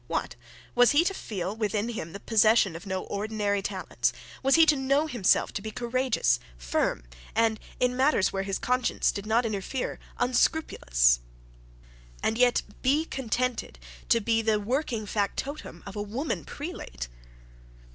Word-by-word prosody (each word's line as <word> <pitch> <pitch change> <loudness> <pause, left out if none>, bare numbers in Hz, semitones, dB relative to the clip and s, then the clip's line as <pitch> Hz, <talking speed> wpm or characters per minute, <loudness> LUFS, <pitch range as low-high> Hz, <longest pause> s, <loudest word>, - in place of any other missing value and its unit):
What! - - -2 0.4
Was 245 +1 +5
he 300 +4 +5
to 390 - 0
feel 195 - -4
within 215 0 -1
him 205 -8 -5
the 200 - -7
possession 215 -4 +4
of 170 +4 -9
no 190 -1 -2
ordinary 205 -1 -1
talents; 195 -2 -1 0.3
was 270 0 +4
he 325 -1 +7
to 305 - +5
know 275 +2 +2
himself 240 -11 +2
to 205 - -3
be 220 - -5
courageous, 240 - +1 0.2
firm, - - -1 0.3
and, 225 -1 +2 0.2
in 250 0 +2
matters 260 -6 +3
where 195 - 0
his 195 0 -2
conscience 250 0 +1
did 200 +1 -6
not 230 +2 +2
interfere, 215 +4 -3 0.2
unscrupulous; - - +2 1.0
and 220 - +1
yet 250 -1 +4 0.2
be 290 +5 +2
contented 250 - -2 0.3
to 230 - +5
be 225 +1 +1
the 220 -1 +2
working 235 0 -1
factotum 205 - -3
of 200 - -8
a 205 - -2
woman 235 +9 -3
prelate? 285 - -6
225 Hz, 150 wpm, -27 LUFS, 200-255 Hz, 1.0 s, he